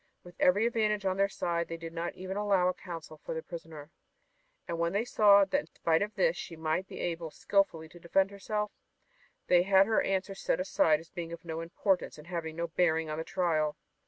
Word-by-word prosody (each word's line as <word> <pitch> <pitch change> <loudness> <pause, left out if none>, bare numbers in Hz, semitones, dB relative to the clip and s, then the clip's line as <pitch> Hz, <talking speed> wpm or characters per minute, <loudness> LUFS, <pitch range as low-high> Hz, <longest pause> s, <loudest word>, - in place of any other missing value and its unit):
With 175 - -13
every 205 +5 +4
advantage 215 -3 +1
on 190 -1 +1
their 200 0 +3
side 170 -3 -1
they 165 - -5
did 165 0 -8
not 170 +1 -3
even 185 +1 -5
allow 200 -3 +2
a 185 - +2
counsel 165 -4 -9
for - - -4
their 160 - -4
prisoner, 160 -2 -9 0.8
and 170 - -3
when 170 +1 0
they 210 +4 +1
saw 200 -4 +6
that 280 +9 +1
in - - -8
spite 160 -1 +1
of 210 +1 -2
this - - +2
she 170 - -7
might 160 +4 -1
be - - -9
able 165 -1 -3
skilfully 165 -2 0
to 175 - -14
defend 190 +4 +1
herself, 210 +1 -3 0.7
they 180 -1 +5
had 190 +1 +5
her 220 +1 +2
answers 195 0 -2
set - - +1
aside 160 -4 +3
as 165 0 -15
being 170 -2 -6
of 170 +1 -8
no 165 0 -4
importance 180 +2 -1
and 150 - -12
having 165 -3 -4
no 170 +1 -2
bearing 160 -2 +1
on 155 - -3
the - - -2
trial. 160 -5 0
175 Hz, 215 wpm, -30 LUFS, 165-195 Hz, 0.8 s, saw